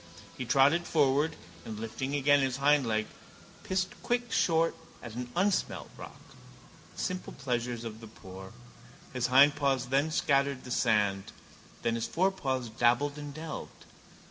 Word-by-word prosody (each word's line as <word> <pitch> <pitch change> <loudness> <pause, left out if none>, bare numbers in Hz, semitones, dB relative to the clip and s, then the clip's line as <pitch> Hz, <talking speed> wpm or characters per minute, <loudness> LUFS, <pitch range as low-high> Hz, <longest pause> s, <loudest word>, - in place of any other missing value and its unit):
He 130 - -5
trotted 140 +8 +4
forward 150 +1 +2 0.3
and, 110 +1 -7
lifting 120 +5 -4
again 145 0 +4
his 135 -2 0
hindleg, 135 -7 +2 0.6
pissed 185 0 -1
quick 245 -1 -1
short 165 -1 +2 0.2
at 115 -2 -9
an 120 +1 -6
unsmelt 190 +3 0
rock. - - -11 0.7
The - - -5
simple 185 -1 -4
pleasures 120 -3 -3
of 110 -1 -7
the 115 - -9
poor. 95 -3 -11 0.6
His 125 -1 0
hindpaws 135 -1 +4
then 140 +4 +2
scattered 140 -3 +1
the 125 - -9
sand: 105 -5 +1 0.5
then 115 - +1
his 115 -1 -2
forepaws 140 -10 0
dabbled 125 +6 +2
and 145 -1 -6
delved. 155 +1 -8
135 Hz, 140 wpm, -30 LUFS, 120-150 Hz, 0.7 s, trotted